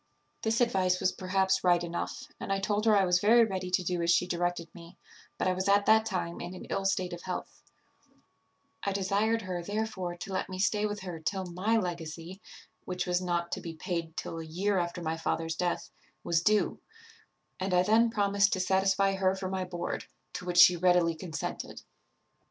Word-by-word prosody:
"This 225 +2 +1
advice 185 -6 +2
was 185 - +2
perhaps 190 0 0
right 175 -1 +4
enough; 170 0 -4
and - - -5
I 195 - +1
told 205 +2 0
her 215 -2 +5
I 195 - +4
was 180 0 +3
very 230 +3 +6
ready 190 -3 -3
to 180 0 +1
do 180 0 -1
as 170 - 0
she 175 +1 +4
directed 175 -1 -2
me, 170 +1 -13 0.4
but - - 0
I 185 - +3
was 185 +2 -1
at 200 0 +4
that 220 0 +5
time 180 -4 -3
in 180 - -6
an - - -9
ill 195 - -1
state 185 -2 0
of 175 - -7
health; 180 -1 -6 1.2
I 200 - -1
desired 205 +4 +1
her 180 -2 -3
therefore 200 -2 -3
to 190 +2 -7
let 185 - -2
me 185 - -5
stay 205 +2 +1
with 205 0 -5
her 180 -3 -6
till 190 +4 -2
my 185 +6 0
legacy, 170 -1 -5 0.4
which 180 -1 -3
was 180 0 0
not 175 -1 -1
to - - -3
be 165 -1 -7
paid 165 0 -4
till 165 - -4
a - - -5
year 185 +5 0
after 175 0 -3
my 160 0 -2
father's 165 0 -1
death, 175 +1 -2 0.3
was 165 -1 +1
due; 210 +3 +2 0.8
and 190 +1 -2
I 180 0 +4
then 225 +4 +4
promised 200 -2 +2
to 185 - 0
satisfy 195 +1 +2
her 190 0 +1
for 190 -1 -4
my 190 -1 -2
board, 175 -1 -4 0.3
to - - -6
which 175 -1 -2
she 180 0 +9
readily 175 -1 +3
consented. 160 0 -6
185 Hz, 200 wpm, -30 LUFS, 175-195 Hz, 1.2 s, she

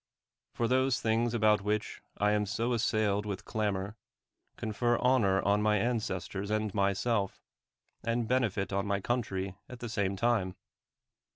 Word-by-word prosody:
For 115 - +1
those 130 0 +2
things 115 +1 +1
about 105 -2 +4
which 105 +1 -2 0.2
I 105 0 +3
am 105 0 +1
so 115 +5 0
assailed 110 -3 +1
with 100 -3 -5
clamor, 100 -1 -2 0.6
con 110 - -3
fer 120 +3 +2
honor 115 -7 +3
on 100 +1 +3
my 105 0 +3
ancestors 100 -4 -2
and 110 -1 0
myself, 100 +1 0 0.6
and 115 0 0
bene 125 -1 +2
fit 100 0 -3
on 100 +1 0
my 100 -1 +1
country 95 -4 -2
at 125 - -8
the 120 0 -6
same 100 -3 0
time. 100 -4 +1
105 Hz, 155 wpm, -31 LUFS, 100-115 Hz, 0.6 s, about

